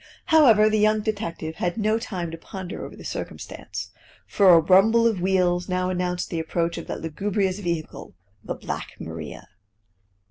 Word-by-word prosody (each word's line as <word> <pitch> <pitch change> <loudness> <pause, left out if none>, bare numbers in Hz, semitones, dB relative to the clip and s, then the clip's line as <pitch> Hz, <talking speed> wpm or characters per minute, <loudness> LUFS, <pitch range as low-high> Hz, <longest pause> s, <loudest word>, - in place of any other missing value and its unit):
However, 230 -9 +7
the 215 0 +2
young 215 0 +3
detective 170 -7 -4
had 175 +2 -2
no 215 +1 +1
time 180 -7 -4
to 165 - -6
ponder 190 +1 -7
over - - -8
the - - -12
circumstance, - - -6 0.3
for 200 -2 +4
a 170 -2 +9
rumble 195 +7 +5
of 220 -6 +1
wheels 180 -1 +1
now 185 0 0
announced 180 -1 -2
the 165 - -1
approach 165 +1 -1
of - - -9
that - - -5
lugubrious 190 +4 -1
vehicle, 170 - -4 0.3
the - - -4
Black - - -6
Maria. 80 -2 -8
185 Hz, 165 wpm, -24 LUFS, 170-210 Hz, 0.3 s, a